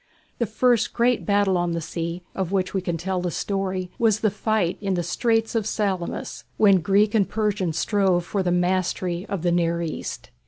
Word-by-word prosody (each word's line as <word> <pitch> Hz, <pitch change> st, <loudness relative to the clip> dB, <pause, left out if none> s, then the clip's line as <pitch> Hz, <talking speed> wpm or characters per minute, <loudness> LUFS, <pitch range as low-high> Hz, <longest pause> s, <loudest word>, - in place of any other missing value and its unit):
The 235 Hz, -, +1 dB
first 230 Hz, +1 st, +2 dB
great 240 Hz, 0 st, +1 dB
battle 200 Hz, -3 st, +3 dB
on 175 Hz, -1 st, 0 dB
the 170 Hz, -, -1 dB
sea, 170 Hz, +2 st, -4 dB
of 190 Hz, -2 st, -3 dB
which 185 Hz, -2 st, 0 dB
we 190 Hz, -, 0 dB
can 175 Hz, -2 st, -2 dB
tell 185 Hz, +2 st, -2 dB
the 180 Hz, -, -1 dB
story, 190 Hz, 0 st, -2 dB
was 220 Hz, -3 st, +3 dB
the 215 Hz, -, +2 dB
fight 210 Hz, -4 st, 0 dB
in 195 Hz, -2 st, 0 dB
the 175 Hz, -, -1 dB
Straits 225 Hz, +6 st, 0 dB
of 225 Hz, -3 st, 0 dB
Salamis, 190 Hz, -5 st, -2 dB
when 195 Hz, -4 st, +5 dB
Greek 200 Hz, +4 st, +3 dB
and 210 Hz, -4 st, +2 dB
Persian 210 Hz, -5 st, 0 dB
strove 185 Hz, +1 st, +1 dB
for 200 Hz, -, -1 dB
the 180 Hz, -1 st, 0 dB
mastery 180 Hz, +1 st, 0 dB
of 195 Hz, -4 st, -3 dB
the 175 Hz, -, +2 dB
near 170 Hz, -1 st, +1 dB
East. 160 Hz, -, -5 dB
190 Hz, 195 wpm, -24 LUFS, 175-210 Hz, -, when